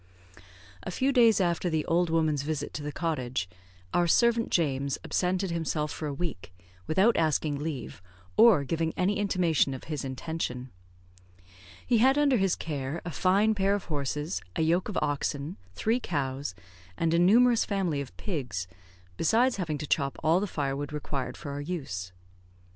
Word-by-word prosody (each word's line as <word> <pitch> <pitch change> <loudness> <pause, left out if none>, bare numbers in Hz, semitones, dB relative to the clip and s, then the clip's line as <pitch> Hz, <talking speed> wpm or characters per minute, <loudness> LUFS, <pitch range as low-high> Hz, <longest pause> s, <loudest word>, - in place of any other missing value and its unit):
A - - -6
few 260 +9 +1
days 230 -5 +5
after 175 -1 +1
the 160 -2 0
old 175 +1 +2
woman's 160 -3 +1
visit 145 0 -3
to - - -4
the 150 0 -4
cottage, 130 - -2 0.5
our 175 0 +3
servant 235 +5 +3
James 140 -4 0
absented 185 0 0
himself 155 -2 -1
for 155 - -4
a 145 - -3
week, 145 - -5 0.4
without 195 +9 +4
asking 155 -2 +1
leave, 145 - -5 0.3
or 220 -10 +6
giving 160 +3 -1
any 195 +3 +1
intimation 175 -8 +2
of 130 - -9
his 150 -3 -4
intention. 130 -2 -4 1.1
He 240 -3 +3
had 265 +4 +5
under 285 -3 +4
his 195 -3 +2
care 145 0 -4
a 175 - -4
fine 195 +7 +3
pair 200 -1 +2
of 205 - -4
horses, 145 -7 -2
a - - +1
yoke 170 +5 +1
of 205 - -3
oxen, 145 +1 -2 0.2
three 225 - +1
cows, 140 - -3 0.4
and 165 -1 +1
a 170 - +3
numerous 230 +6 +5
family 185 -8 -1
of 135 - -9
pigs, 125 - -3 0.5
besides 235 +8 +3
having 165 -6 -2
to 150 - -5
chop 140 -1 0
all 160 +3 +4
the 205 - -2
firewood 145 -3 -3
required 145 -2 -4
for 145 - -7
our 140 +1 -4
use. 135 - -5
160 Hz, 165 wpm, -28 LUFS, 140-190 Hz, 1.1 s, or